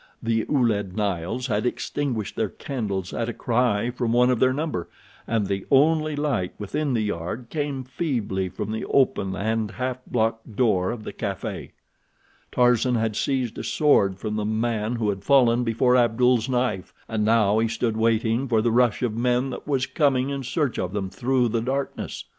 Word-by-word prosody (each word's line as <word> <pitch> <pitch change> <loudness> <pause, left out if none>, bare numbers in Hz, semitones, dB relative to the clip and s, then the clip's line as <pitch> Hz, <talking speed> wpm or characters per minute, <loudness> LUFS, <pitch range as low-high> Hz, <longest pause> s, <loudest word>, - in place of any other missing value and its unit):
The 115 -1 0
Ouled 110 -8 +1
Nails 100 +3 -1
had 110 -4 0
extinguished 125 -3 -2
their 110 -2 0
candles 100 -9 -4
at 115 0 -2
a - - -3
cry 120 -2 +1
from 120 -2 -1
one 125 +1 +4
of 125 - 0
their 130 0 +4
number, 140 - -3 0.4
and 110 -2 +1
the 95 0 -2
only 155 +2 +3
light 140 -11 -1
within 140 +6 -2
the 110 - +1
yard 105 +4 -4
came 145 -4 -2
feebly 120 - -2
from 100 +3 -5
the 110 - -3
open 100 -8 +1
and 110 +2 -1
half 130 +3 -3
blocked 115 -1 -1
door 100 -6 +2
of 120 -2 -5
the - - -7
café. - - -4 0.8
Tarzan 125 0 +3
had 110 -2 0
seized 130 -4 -1
a - - -4
sword 100 - +3
from 105 +2 -3
the 105 - -1
man 110 +1 -1
who 110 -3 0
had 95 -1 -3
fallen 125 -3 +4
before 120 +2 +2
Abdul's 125 0 +3
knife, 125 -7 -1
and 110 -2 -1
now 110 -1 +3
he 115 - +2
stood 115 0 -1
waiting 115 +3 +1
for 110 -3 +2
the 120 - +2
rush 120 0 +2
of 120 -3 0
men 125 +2 +1
that - - -8
was 135 -3 +1
coming 140 -3 +1
in 140 -1 -3
search 135 +1 -1
of 90 +1 -3
them 95 -2 -3
through 125 +4 +1
the 115 0 0
darkness. 135 +3 -3
115 Hz, 180 wpm, -24 LUFS, 105-130 Hz, 0.8 s, one